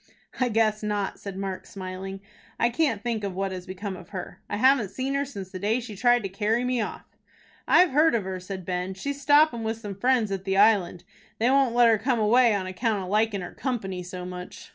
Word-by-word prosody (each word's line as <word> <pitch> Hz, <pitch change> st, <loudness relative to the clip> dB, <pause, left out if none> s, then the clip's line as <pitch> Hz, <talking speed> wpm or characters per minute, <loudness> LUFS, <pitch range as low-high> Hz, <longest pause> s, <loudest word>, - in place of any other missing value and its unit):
"I 255 Hz, -1 st, +2 dB
guess 215 Hz, -1 st, +2 dB
not," 205 Hz, -2 st, -2 dB
said 195 Hz, -2 st, -7 dB
Mark, 195 Hz, -1 st, -5 dB
smiling. 190 Hz, 0 st, -7 dB, 0.4 s
"I 235 Hz, -, +3 dB
can't 235 Hz, -6 st, 0 dB
think 230 Hz, -3 st, -2 dB
what 195 Hz, 0 st, -2 dB
has 185 Hz, 0 st, -7 dB
become 190 Hz, +1 st, -5 dB
of 180 Hz, -1 st, -12 dB
her. 185 Hz, -3 st, -7 dB
I 205 Hz, -, -2 dB
haven't 255 Hz, -3 st, +4 dB
seen 265 Hz, +6 st, -3 dB
her 280 Hz, 0 st, 0 dB
since 200 Hz, -9 st, -8 dB
the 185 Hz, -, -6 dB
day 215 Hz, +5 st, +1 dB
she 230 Hz, -4 st, -8 dB
tried 240 Hz, +3 st, +3 dB
to -, -, -1 dB
carry 210 Hz, +5 st, 0 dB
me 250 Hz, -1 st, 0 dB
off." 210 Hz, -, -5 dB, 0.6 s
"I've 355 Hz, -1 st, +5 dB
heard 300 Hz, -1 st, +4 dB
of 220 Hz, -, 0 dB
her," 190 Hz, 0 st, -4 dB
said 185 Hz, 0 st, -7 dB
Ben. 180 Hz, +1 st, -3 dB
"She's 280 Hz, +8 st, -5 dB
stoppin' 290 Hz, -3 st, +4 dB
with 225 Hz, 0 st, -2 dB
some 210 Hz, -3 st, -6 dB
friends 230 Hz, +1 st, +1 dB
at 195 Hz, -1 st, -3 dB
the 195 Hz, 0 st, -1 dB
Island. 200 Hz, -4 st, +3 dB, 0.3 s
They 235 Hz, +3 st, +2 dB
won't 270 Hz, -3 st, +3 dB
let 240 Hz, -1 st, +6 dB
her 225 Hz, -2 st, +4 dB
come 250 Hz, +3 st, +1 dB
away 230 Hz, +1 st, +4 dB
on 190 Hz, -2 st, -2 dB
account 200 Hz, +2 st, -1 dB
of 180 Hz, -, -7 dB
likin' 210 Hz, -1 st, +1 dB
her 175 Hz, -, -7 dB
company 195 Hz, -9 st, -3 dB
so 180 Hz, 0 st, -7 dB
much." 180 Hz, 0 st, -8 dB
210 Hz, 225 wpm, -26 LUFS, 190-240 Hz, 0.6 s, let